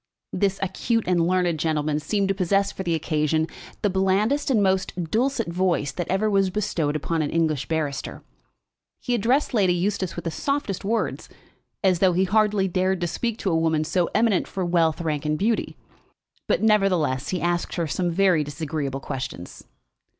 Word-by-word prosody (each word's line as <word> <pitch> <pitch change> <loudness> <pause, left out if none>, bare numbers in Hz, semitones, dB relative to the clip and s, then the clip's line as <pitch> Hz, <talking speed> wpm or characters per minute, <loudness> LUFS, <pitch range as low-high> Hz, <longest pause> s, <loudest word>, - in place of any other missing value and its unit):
This 195 -1 +1
acute 225 +4 0
and 175 -2 +2
learned 180 -3 +1
gentleman 155 -1 0
seemed 200 +5 0
to - - +3
possess 195 +1 +1
for - - -7
the 170 -3 0
occasion 155 0 0 0.4
the 205 - +3
blandest 195 +10 +1
and 220 -6 +3
most 185 -3 -1
dulcet 245 0 +1
voice 175 -5 0
that 175 +3 -4
ever 195 +3 +1
was 195 -2 +2
bestowed 180 -7 -1
upon 160 +2 -1
an 145 - -1
English 155 -4 0
barrister. 150 -3 -3 0.8
He 245 - -2
addressed 245 +6 +1
Lady 190 -6 +3
Eustace 185 0 -1
with 175 - -6
the 165 - -1
softest 280 - -2
words, 225 +4 -2 0.5
as 185 -3 +3
though 185 -1 +4
he 185 +2 +2
hardly 205 0 +2
dared 185 +1 0
to - - +1
speak 225 +6 -2
to 190 - 0
a - - +2
woman 160 -1 +1
so 175 +2 0
eminent 220 -5 +2
for 190 -2 -3
wealth, 170 -2 +2
rank, 150 -3 -2
and 155 0 0
beauty; 220 +5 -1 0.7
but - - +1
nevertheless 185 -11 +2
he 185 - -1
asked 175 0 -1
her 170 - 0
some 175 +4 -1
very 175 -3 +3
disagreeable 145 -2 -4
questions. 130 -11 -6
180 Hz, 175 wpm, -24 LUFS, 160-200 Hz, 0.8 s, though